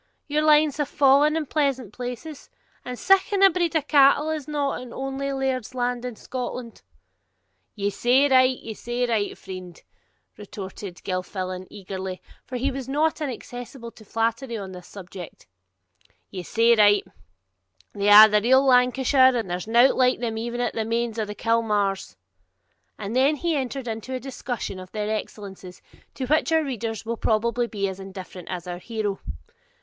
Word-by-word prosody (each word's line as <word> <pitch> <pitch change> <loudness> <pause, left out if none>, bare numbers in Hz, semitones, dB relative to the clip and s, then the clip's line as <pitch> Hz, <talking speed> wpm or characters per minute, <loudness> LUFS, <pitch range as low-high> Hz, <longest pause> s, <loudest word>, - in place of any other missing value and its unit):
your 300 +1 +1
lines 305 -1 +4
have 295 -2 -1
fallen 290 +2 +4
in 320 - -2
pleasant 270 -7 -1
places! 250 +5 -7 0.3
And 250 0 -6
siccan 390 +3 +3
a 390 - +8
breed 345 -2 -1
o' 315 - +2
cattle 290 +1 +4
is 310 -2 -4
not 290 -3 -2
in 250 -1 -10
ony 270 +1 -3
laird's 265 -3 -2
land 245 -1 -1
in 245 -2 -5
Scotland.' 250 -1 -6 0.9
'Ye 200 -1 -1
say 250 +7 +3
right, 255 -1 +4
ye 225 - -7
say 240 +3 -2
right, 220 -4 -1
friend' 185 -2 -9 0.6
retorted 195 -2 -8
Gilfillan 185 0 -4
eagerly, 190 -1 -6 0.3
for 255 - -4
he 270 +3 0
was 265 -1 -6
not 310 +3 +1
inaccessible 245 -3 -6
to 220 - -16
flattery 230 +3 -2
upon 195 -3 -6
this 180 -1 -11
subject, 185 -3 -10 0.9
'ye 185 - -5
say 230 +6 +3
right; 205 -2 +5 0.9
they 200 0 0
are 210 +1 +11
the 210 -1 +2
real 260 +4 +4
Lancashire, 260 +1 +4
and 215 -6 -3
there's 180 +3 -3
no 240 +4 +6
the - - 0
like 255 0 +3
o' - - -16
them 230 -2 -2
even 235 +2 -3
at 240 - -1
the 225 - -1
mains 230 0 -2
of 215 -1 -2
Kilmaurs'; 210 - 0 0.8
and 205 +4 -5
he 295 +6 +2
then 285 - +1
entered 260 0 -5
into 225 +3 -4
a - - -3
discussion 245 -6 -5
of 185 0 -11
their 215 0 -1
excellences, 195 -4 -8 0.4
to 260 - -3
which 310 +5 +1
our 320 -1 +3
readers 230 -5 -4
will 230 +1 -3
probably 235 +3 +1
be 200 -4 -2
as 190 0 -6
indifferent 190 -2 -9
as 180 -1 -5
our 175 -1 -6
hero. 210 -1 -3
235 Hz, 170 wpm, -24 LUFS, 205-270 Hz, 0.9 s, are